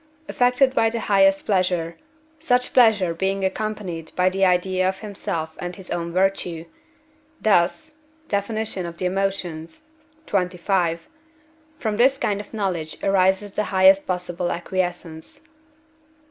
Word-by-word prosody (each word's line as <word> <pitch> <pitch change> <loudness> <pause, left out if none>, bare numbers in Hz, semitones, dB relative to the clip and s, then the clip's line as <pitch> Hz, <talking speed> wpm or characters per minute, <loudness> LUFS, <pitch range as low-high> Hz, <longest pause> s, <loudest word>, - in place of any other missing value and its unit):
affected 250 +2 +2
by 225 -3 +3
the 230 0 -4
highest 195 -1 +3
pleasure, 180 -4 0 0.4
such 250 -6 +1
pleasure 215 -8 +4
being 195 +3 -1
accompanied 190 -5 -4
by 185 0 +2
the 195 +1 -1
idea 185 0 +2
of 190 0 -6
himself 165 -6 -4
and 175 0 -5
his 190 -1 -11
own 170 0 -3
virtue; 180 -3 0 0.7
thus 215 - +1 0.3
(Def. 200 0 -1
of 195 -6 -4
the 185 - -3
Emotions, 180 - -3 0.4
xxv.), 180 -2 0 0.8
from 215 -5 -2
this 265 +3 +4
kind 205 -5 -1
of - - -15
knowledge 185 -7 -3
arises 195 +1 +2
the 210 +2 -1
highest 190 0 +4
possible 180 -1 -2
acquiescence. 175 -2 -4
190 Hz, 125 wpm, -22 LUFS, 175-205 Hz, 0.8 s, pleasure